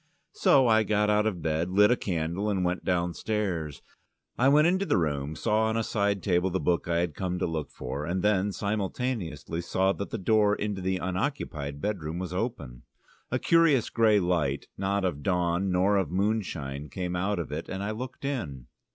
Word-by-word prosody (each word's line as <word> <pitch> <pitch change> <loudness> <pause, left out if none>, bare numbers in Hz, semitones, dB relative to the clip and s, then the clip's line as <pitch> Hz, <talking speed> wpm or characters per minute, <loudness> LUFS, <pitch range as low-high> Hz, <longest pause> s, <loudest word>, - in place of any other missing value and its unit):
So 135 -3 +4
I 110 -1 +5
got 105 0 +2
out 105 +1 +3
of 90 -7 -3
bed, 80 +2 0
lit 105 +4 +5
a - - +5
candle, 90 +1 -2
and 95 -3 0
went 90 +1 -1
downstairs. 90 -2 -2 0.5
I 130 +2 +4
went 150 +2 +5
into 185 +3 +2
the 150 - +1
room, 75 -3 -1
saw 110 +5 +1
on 110 0 0
a 115 - +1
side 100 -2 0
table 90 -1 +2
the 95 +1 -1
book 85 -2 0
I 85 0 +1
had 85 -3 -2
come 90 +2 -3
to 90 - 0
look 80 -3 -3
for, 65 +4 -5
and 90 +4 -2
then, 105 -1 +2
simultaneously, 100 - -3
saw 95 +2 +1
that 100 - -5
the - - -3
door 105 +1 +3
into 105 -2 -3
the 95 0 0
unoccupied 90 - -3
bedroom 85 -6 -3
was 90 -1 -4
open. 80 - -4 0.5
A - - 0
curious 165 -7 +3
grey 110 -3 +4
light, 90 -4 0
not 100 0 -1
of 80 -6 -2
dawn 90 +2 0
nor 95 +3 +3
of 95 -6 0
moonshine, 85 -8 -2
came 90 -1 -3
out 95 +3 0
of 85 - -4
it, - - -5
and 95 +1 -4
I 105 - -2
looked 130 +5 -6
in. 80 - -4
95 Hz, 195 wpm, -28 LUFS, 85-105 Hz, 0.5 s, I